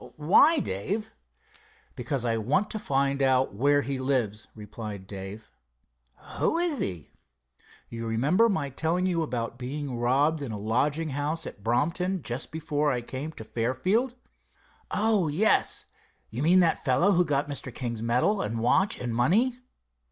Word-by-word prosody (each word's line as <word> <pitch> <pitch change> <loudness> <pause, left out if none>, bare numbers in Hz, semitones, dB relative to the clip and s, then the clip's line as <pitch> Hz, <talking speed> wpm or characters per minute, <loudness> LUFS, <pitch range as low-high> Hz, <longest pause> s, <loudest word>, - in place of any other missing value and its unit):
"Why, 175 - +5
Dave?" 205 - -2 0.8
"Because 135 -5 -2
I 115 -1 +1
want 140 - 0
to 215 - -2
find 140 -5 0
out 130 -2 +2
where 145 +6 +2
he 135 -1 -3
lives," 120 -6 -1
replied 105 -2 -8
Dave. 100 +2 -8 0.9
"Who 325 - +2
is 340 -6 +1
he?" 85 -6 -2 0.8
"You 115 0 -6
remember 150 - +3
my 145 -9 -1
telling 165 +6 0
you 175 -3 +1
about 120 -5 -3
being 135 +1 -4
robbed 140 +6 +1
in 135 -5 -4
a 105 - -4
lodging 140 +10 0
house 150 +4 -2
at 100 - -9
Brompton, 170 - 0
just 120 +4 -4
before 150 -2 -1
I 125 - -1
came 135 +6 -5
to 110 - -9
Fairfield?" 180 - 0 0.7
"Oh, 210 -5 +2
yes. 180 +9 +1 0.5
You 115 +4 -4
mean 175 +5 +5
by 165 -2 +5
the - - -7
fellow 135 +9 +2
who 180 -2 +4
got 145 -3 0
Mr. 140 -2 -5
King's 115 -2 -4
medal 125 - +1
and 115 +2 -3
watch 185 - +2
and 120 -2 -3
money?" 220 - +2
140 Hz, 155 wpm, -27 LUFS, 120-170 Hz, 0.9 s, Why